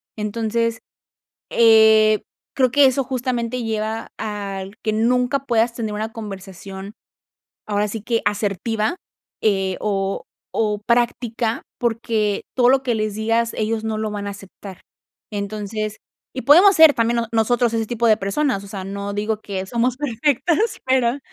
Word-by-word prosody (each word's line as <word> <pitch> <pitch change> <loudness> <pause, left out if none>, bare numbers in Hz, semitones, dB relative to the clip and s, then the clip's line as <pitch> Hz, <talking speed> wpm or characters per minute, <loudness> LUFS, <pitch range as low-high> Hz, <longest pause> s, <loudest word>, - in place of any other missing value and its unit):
Entonces, 225 +1 -1 0.7
eh, 220 -2 +6 0.3
creo 255 -2 +3
que 285 +2 +6
eso 265 +1 +2
justamente 250 -1 -2
lleva 220 0 -3
al 200 -2 -5
que 215 - 0
nunca 250 +4 +1
puedas 230 -1 +2
tener 225 -3 -3
una 220 +2 -4
conversación, 195 -2 -8 0.7
ahora 210 0 0
sí 215 +1 -5
que 230 +1 0
asertiva, 210 - -1 0.4
eh, 195 -3 +1
o 195 -2 -1 0.3
o 210 -2 +1
práctica, 235 0 0 0.2
porque 225 -3 -1
todo 250 -1 +4
lo 265 0 +3
que 245 -3 0
les 215 -1 -2
digas 225 +2 0
ellos 220 0 -1
no 220 -1 -2
lo 215 0 -2
van 205 -1 -5
a - - -3
aceptar. 195 -1 -11 0.5
Entonces 210 +1 -4 0.4
y 260 - -4
podemos 360 +8 +7
ser 320 -2 +8
también 235 0 +1
no 235 0 0
nosotros 235 +1 +2
ese 225 -1 0
tipo 235 +1 -1
de 220 -2 +5
personas, 200 +2 -1
o - - -11
sea, 195 -2 -6
no 200 +1 -5
digo 210 +1 -2
que 190 -2 -4
somos 240 +3 0
perfectas, 295 - 0
pero 260 0 +2
220 Hz, 150 wpm, -21 LUFS, 210-240 Hz, 0.7 s, ser